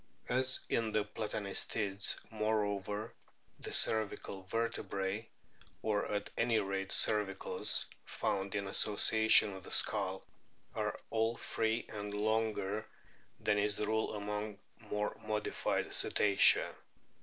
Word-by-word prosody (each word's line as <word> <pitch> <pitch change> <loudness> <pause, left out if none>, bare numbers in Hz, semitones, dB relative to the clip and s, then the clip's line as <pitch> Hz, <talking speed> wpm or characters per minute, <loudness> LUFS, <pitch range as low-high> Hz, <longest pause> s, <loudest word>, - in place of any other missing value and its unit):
As 130 +1 +2
in 110 -2 0
the 105 -1 +1
Platanistids, 100 -1 -1
moreover, 105 -1 -1 0.5
the - - -5
cervical 105 -3 +1
vertebrae, 105 -1 -3 0.5
or 105 -2 0
at 105 0 -3
any 115 -1 +2
rate 95 -1 -3
cervicals 105 -2 +2 0.2
found 100 0 -2
in 100 -1 -1
association 110 +1 +4
with 95 -1 -9
the - - -9
skull, - - +4 0.5
are - - -2
all 115 +1 +1
free, 110 +1 -1
and 105 -1 -6
longer 110 -1 -1 0.5
than 105 - +2
is 105 0 +1
the 105 - -2
rule 110 0 -1
among 105 0 -4 0.2
more 105 -2 -3
modified 105 0 -1
Cetacea. 100 -1 +4
105 Hz, 110 wpm, -34 LUFS, 100-110 Hz, 0.5 s, association